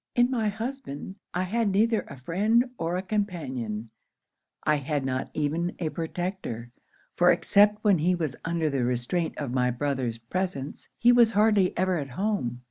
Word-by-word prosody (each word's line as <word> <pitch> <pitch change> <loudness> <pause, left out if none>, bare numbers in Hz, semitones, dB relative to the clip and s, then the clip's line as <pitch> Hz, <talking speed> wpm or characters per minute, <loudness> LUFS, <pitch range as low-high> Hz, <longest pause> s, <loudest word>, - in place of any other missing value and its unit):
'In 245 +1 +4
my 225 -4 +1
husband, 220 - -6
I 180 - -1
had 220 +3 0
neither 220 +3 +3
a - - -9
friend 215 - +1
or 170 +2 -1
a 185 - -3
companion 130 - -3 0.7
I 150 - +3
had 145 0 -2
not 130 -1 -2
even 160 +4 -1
a 165 -3 -2
protector; 165 - -4 0.4
for - - +5
except 210 +1 +4
when 200 -5 +4
he 180 +4 +2
was 160 -6 -2
under 165 -1 0
the 135 -3 0
restraint 125 +8 -1
of 140 -5 -3
my 125 -1 +2
brother's 125 -2 -1
presence, 140 +3 -4
he 240 - +5
was 240 -2 +6
hardly 210 -3 +3
ever 185 -2 +1
at 140 -2 -5
home. 135 - -2
175 Hz, 165 wpm, -27 LUFS, 135-205 Hz, 0.7 s, was